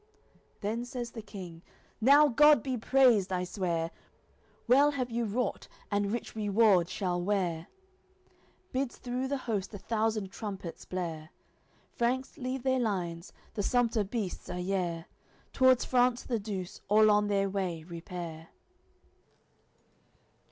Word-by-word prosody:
Then 220 +4 -2
says 245 -1 -5
the 225 - -7
King: 185 -5 -9 0.4
"Now 285 +5 +7
God 295 +3 +6
be 260 -2 -1
praised, 240 -5 +4
I 180 -1 0
swear! 170 -3 -2 0.8
Well 275 +5 +6
have 255 -4 -3
you 235 0 0
wrought, 230 +4 -2 0.2
and 205 0 +1
rich 235 0 -4
reward 205 -4 +3
shall 180 -3 -1
wear." 175 -4 -1 1.0
Bids 260 -1 -2
through 250 +1 -3
the 280 +1 -1
host 205 -3 -2
a - - -4
thousand 215 -1 -1
trumpets 195 -5 -6
blare. 165 -4 -4 0.6
Franks 255 +3 -1
leave 255 0 -3
their 260 -1 +2
lines; 180 -6 -2 0.2
the 215 - -2
sumpter 230 0 +2
beasts 200 -3 -4
are 180 - -4
yare 180 -3 -2 0.5
T'wards 260 -2 +4
France 250 -1 +2
the 235 -3 -1
Douce 195 -3 -6
all 215 +1 +6
on 210 0 +3
their 200 -1 +1
way 185 -4 -3
repair. 170 -1 -7
210 Hz, 130 wpm, -30 LUFS, 180-245 Hz, 1.0 s, Now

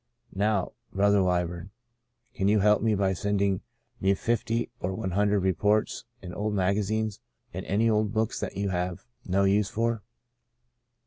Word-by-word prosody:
Now, 100 -1 +1 0.2
Brother 100 +1 +3
Wyburn, 90 0 -1 0.6
you 95 - -2
can 105 +1 +4
help 105 +1 +4
me 110 -1 +2
by 95 -1 +1
sending 100 0 0 0.4
me 95 +1 +3
fifty 115 +2 -1
or 95 +1 -2
one 95 - -3
hundred 100 +1 +2
reports 105 +3 +1 0.2
and 90 -1 -7
old 105 0 -1
magazines, 105 +2 0 0.3
and - - -4
any 110 +4 +2
old 105 -2 +2
books 110 0 0
that - - -4
you 100 0 0
have 90 -1 -2 0.2
no 95 +2 +2
use 100 +1 +3
for. 115 0 -1
100 Hz, 150 wpm, -27 LUFS, 95-105 Hz, 0.6 s, can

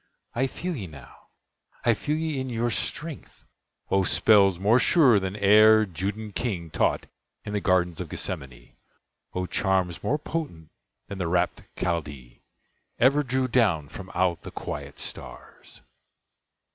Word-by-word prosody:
I 130 +3 +1
feel 175 +6 -4
ye 100 -9 -5
now—I 80 - -6
feel 150 +7 -2
ye 160 -3 -2
in 130 - -4
your 120 0 -1
strength— 155 +3 -5 0.5
O 95 - +4
spells 100 -1 +4
more 105 +7 +4
sure 130 - +5
than 95 0 -4
e'er 110 +2 +6
Judæan 100 +4 -5
king 90 -10 -3
Taught - - +1 0.4
in 105 - -5
the 105 - -1
gardens 90 -3 +1
of - - -6
Gethsemane! - - -6 0.6
O 90 0 -1
charms 95 -3 0
more 145 - +1
potent 145 - -5 0.4
than 100 - -7
the 90 - -1
rapt 90 +1 0 0.2
Chaldee 70 -9 -4 0.6
Ever 140 +4 +4
drew 130 -1 0
down 105 - +2
from 95 - -9
out 90 -2 +1
the - - -8
quiet 70 -1 -7
stars! - - -9
100 Hz, 140 wpm, -26 LUFS, 90-120 Hz, 0.6 s, e'er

